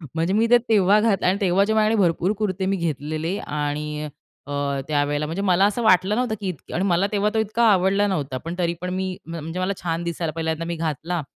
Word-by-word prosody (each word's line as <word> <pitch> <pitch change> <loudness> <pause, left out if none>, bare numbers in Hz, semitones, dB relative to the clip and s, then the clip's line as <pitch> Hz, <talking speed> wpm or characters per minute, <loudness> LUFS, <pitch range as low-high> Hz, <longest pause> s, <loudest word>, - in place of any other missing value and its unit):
म्हणजे 165 +3 0
मी 225 +3 +3
ते 245 - +9
तेव्हा 205 -1 +5
घातलं 210 -3 +1
आणि 185 +2 +2
तेव्हा 190 0 +3
जे 220 - 0
माझ्याकडे 215 0 +3
भरपूर 175 +1 +2
कुर्ते 195 -3 -1
मी 195 +1 +1
घेतलेले 155 +2 -2
आणि 150 0 -3 0.4
अ, - - -7 0.4
त्यावेळेला 145 0 0
म्हणजे 165 +6 -3
मला 190 -1 +3
असं 210 +4 0
वाटलं 190 -1 +4
नव्हतं, 245 -2 0
की 200 - -3
इतके 165 -7 -8
आणि 180 - 0
मला 185 +1 +2
तेव्हा 210 0 +1
तो 220 - +1
इतका 220 +2 0
आवडला 195 +2 +3
नव्हता. 145 -9 -2
पण 165 +6 -6
तरी 170 -1 +1
पण 180 - -3
मी 190 0 -2 0.2
म्ह 165 +1 -6
म्हणजे 165 +4 -5
मला 185 +2 0
छान 165 -1 -2
दिसायला 170 -1 -3
पहिल्यांदा 160 0 -2
मी 170 0 -3
घातला, 165 +2 -2
180 Hz, 220 wpm, -23 LUFS, 160-200 Hz, 0.4 s, ते